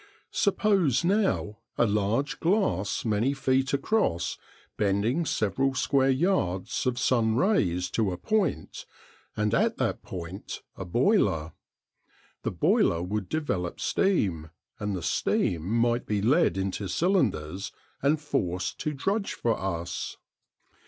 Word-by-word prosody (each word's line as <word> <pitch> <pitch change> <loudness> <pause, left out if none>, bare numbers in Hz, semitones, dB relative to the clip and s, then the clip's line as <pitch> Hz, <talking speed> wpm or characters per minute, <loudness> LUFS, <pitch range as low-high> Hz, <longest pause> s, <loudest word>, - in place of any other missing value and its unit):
Suppose 195 - +2
now 190 - +1 0.2
a - - +4
large 105 +6 0
glass 165 - 0
many 115 +5 +1
feet 135 0 +1
across 140 - 0 0.4
bending 105 - +1
several 130 +7 0
square 135 0 +2
yards 130 - 0
of 125 -1 0
sun 115 -3 +2
rays 95 - +2
to 110 -4 +1
a 90 - -4
point, 205 - -1 0.5
and 105 +1 +1
at - - +2
that - - -1
point 90 +2 -7
a 95 - -6
boiler. 90 - +2 0.9
The - - -1
boiler 85 +1 +2
would 100 +1 -3
develop 100 - -2
steam, 95 - 0 0.3
and 105 -2 -2
the 90 - -5
steam 85 +1 0
might 120 +1 +1
be 105 -1 0
led 145 - +3
into 95 +1 -2
cylinders 100 - 0 0.3
and 145 +3 +2
forced 90 - -2
to 155 -2 -2
drudge 195 +9 -1
for 115 -1 0
us. 85 -3 -4
115 Hz, 125 wpm, -27 LUFS, 95-145 Hz, 0.9 s, a